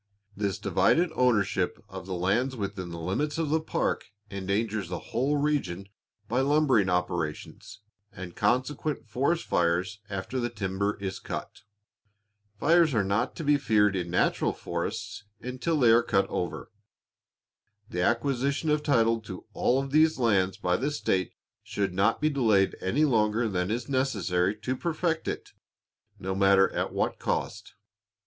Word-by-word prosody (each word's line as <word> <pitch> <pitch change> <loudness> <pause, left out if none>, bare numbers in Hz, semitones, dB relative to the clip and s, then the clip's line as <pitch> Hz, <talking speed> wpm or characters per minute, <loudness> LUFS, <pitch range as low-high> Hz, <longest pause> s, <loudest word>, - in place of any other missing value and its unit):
This 100 -2 -1
divided 175 0 +2
ownership 105 - +1
of 95 -2 -9
the 95 - -3
lands 110 +9 0
within 100 -4 -4
the 85 - -7
limits 100 - -2
of 165 -2 -1
the 160 +2 +2
park - - -1 0.3
endangers 100 0 -2
the 90 +6 -7
whole 135 +6 +1
region 100 -11 -1 0.4
by 125 +4 +1
lumbering 135 -8 +3
operations, 90 +2 -3 0.3
and 90 -2 -9
consequent 130 +4 0
forest 140 +9 0
fires 90 +5 0
after 100 +6 -3
the 120 0 -1
timber 100 0 -2
is 95 -1 -4
cut. - - -6 1.0
Fires 165 -1 +4
are 105 - +3
not 100 +3 0
to 165 - -5
be 145 0 +4
feared 105 -7 +2
in 90 -2 -2
natural 90 - +1
forests - - -5
until 130 +6 -2
they 120 -4 +6
are 115 +1 +6
cut 100 -4 +1
over. 90 - -4 1.2
The 90 -4 -3
acquisition 135 - +1
of 150 0 +2
title 115 -6 +2
to 95 -4 -9
all 135 +2 +1
these 155 +3 +3
lands 100 -7 +2
by 90 0 0
the 140 - -1
state 95 - -1 0.3
should 100 -3 -2
not 100 +5 +2
be 155 +1 +1
delayed 110 -8 +2
any 130 +12 +2
longer 115 -3 +2
than 90 -2 -1
is 120 +3 -2
necessary 105 -9 0
to 130 +3 -1
perfect 165 +2 -1
it, - - -4 0.7
no 95 +1 -3
matter 95 0 +4
at - - -2
what - - -1
cost. - - -3
110 Hz, 150 wpm, -27 LUFS, 95-135 Hz, 1.2 s, they